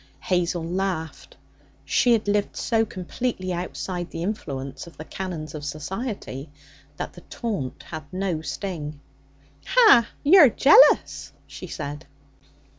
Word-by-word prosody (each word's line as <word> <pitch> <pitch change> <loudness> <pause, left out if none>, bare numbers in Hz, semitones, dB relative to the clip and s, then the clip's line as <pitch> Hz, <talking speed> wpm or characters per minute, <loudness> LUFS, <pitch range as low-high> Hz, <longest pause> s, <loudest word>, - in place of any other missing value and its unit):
Hazel 175 -2 0
laughed. 175 -2 -4 0.5
She 245 - +3
had 220 -2 0
lived 205 0 0
so 225 -1 +1
completely 185 0 -4
outside 175 0 -4
the 165 - -5
influence 140 -8 -5
of 170 - -15
the 155 - -8
canons 165 -6 -6
of 150 -2 -7
society 155 - -5 0.5
that - - -5
the 175 - -13
taunt 200 - -4
had 155 -3 -9
no 185 -4 -2
sting. 155 -5 -5 0.7
'Ha! 425 - +6 0.2
you're 305 -2 +8
jealous!' 300 - +5
she - - -9
said. 145 +1 -6
180 Hz, 120 wpm, -24 LUFS, 155-215 Hz, 0.7 s, you're